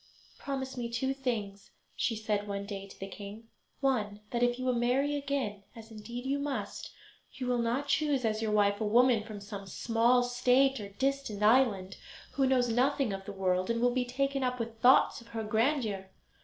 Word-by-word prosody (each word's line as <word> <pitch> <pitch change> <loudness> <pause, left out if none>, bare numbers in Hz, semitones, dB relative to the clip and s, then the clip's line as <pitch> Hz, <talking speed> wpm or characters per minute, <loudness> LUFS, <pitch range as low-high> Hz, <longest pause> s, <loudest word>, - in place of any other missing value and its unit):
"Promise 265 -1 -4
me 235 -1 -3
two 265 +3 -1
things," 215 -7 -4 0.3
she 230 - 0
said 210 -1 -2
one 200 0 -3
day 195 -1 -6
to - - -15
the 195 - -4
king; 205 +3 -9 0.3
"one, 215 -7 0
that 240 - -1
if 245 0 +2
you 255 0 0
marry 255 +5 +1
again, 275 -8 -2
as 225 0 -12
indeed 235 +3 -7
you 275 +1 0
must, 265 -8 -4 0.4
you 255 - -5
will 250 -1 +1
not 240 +5 0
choose 280 -3 +1
as 215 0 0
your 220 - 0
wife 205 0 +2
a - - +2
woman 235 +2 +4
from 215 -2 -8
some 200 -1 -8
small 235 +5 +2
state 250 +2 +3
or 200 -1 -6
distant 265 -1 -2
island, 210 -5 +3 0.3
who 270 -1 +1
knows 255 -2 +3
nothing 250 0 +1
of 195 0 -6
the 205 - -6
world, 185 -1 0
and 230 0 +1
will 245 +1 +2
be 255 0 +1
taken 275 +2 -1
up 250 0 0
with 225 -1 -5
thoughts 255 +1 +5
of 235 - -16
her 225 -1 -4
grandeur. 220 -3 0
235 Hz, 195 wpm, -31 LUFS, 210-260 Hz, 0.4 s, thoughts